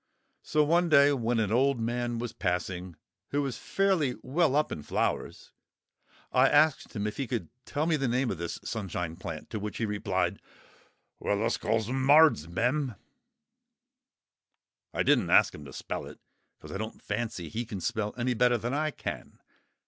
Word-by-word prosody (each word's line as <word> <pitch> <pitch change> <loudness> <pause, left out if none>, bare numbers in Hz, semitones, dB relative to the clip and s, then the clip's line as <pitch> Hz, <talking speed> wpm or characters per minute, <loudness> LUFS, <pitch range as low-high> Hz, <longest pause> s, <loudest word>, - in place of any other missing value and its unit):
So 150 - +2
one 170 +3 +3
day 145 -1 +6
when 120 -3 0
an 105 -2 0
old 130 +2 +3
man 120 +1 -1
was 115 -1 -4
passing, 90 -1 -2 0.3
who 145 0 0
is 130 -4 -4
fairly 185 -10 +1
well 150 +1 +2
up 150 +1 +2
in - - -4
flowers, - - -2 0.8
I - - +5
asked 155 -4 +3
him 105 -1 -2
if 105 - -3
he 135 - -2
could 115 -10 -3 0.2
tell 150 +1 -1
me 165 -1 +2
the 135 -2 0
name 125 +1 +1
of 90 - -5
this 85 -1 -4
Sunshine 90 -6 -4
plant. 80 -3 -7
To 110 - -3
which 105 +1 -5
he 115 - 0
replied— 105 -1 -1 0.8
"Wealluscallsemards'm." 120 - +2 2.0
I - - 0
didn't - - +3
ask - - +5
him 75 - -10
to 65 - -10
spell - - -5
it, - - -11 0.4
because - - -12
I 95 - -4
don't 110 +1 -5
fancy 105 -5 -3
he 115 +10 -3
can 105 -4 -6
spell 105 +4 -2
any 125 +1 0
better 120 +1 +3
than 120 +3 -3
I 155 +2 +1
can. - - -6
120 Hz, 165 wpm, -29 LUFS, 105-140 Hz, 2.0 s, day